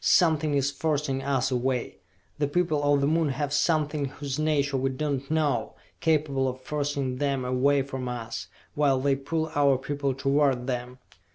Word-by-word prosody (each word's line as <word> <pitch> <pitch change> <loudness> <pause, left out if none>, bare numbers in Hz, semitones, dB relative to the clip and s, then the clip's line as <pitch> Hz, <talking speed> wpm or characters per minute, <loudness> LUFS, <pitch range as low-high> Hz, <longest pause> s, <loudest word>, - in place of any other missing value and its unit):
Something 155 -4 +3
is 140 0 +1
forcing 145 -2 -1
us 135 -1 0
away! 125 0 -1 0.4
The 145 - +2
people 155 -1 +1
of 145 -1 +3
the 140 - +2
Moon 160 0 +2
have 145 +1 -2
something 150 -1 +1
whose 140 0 -5
nature 145 -3 +1
we 135 0 +1
do 145 +3 -2
not 135 - -18
know, 145 -8 0 0.2
capable 150 -4 +1
of 130 0 -4
forcing 140 -2 -2
them 140 -2 -1
away 135 +2 +2
from 130 -2 -5
us 115 -2 -5 0.3
while 140 -3 +2
they 140 +1 +2
pull 155 +3 -2
our 140 -2 +4
people 140 0 -2
toward 135 -2 +2
them! 125 -1 -4
140 Hz, 170 wpm, -27 LUFS, 130-150 Hz, 0.4 s, our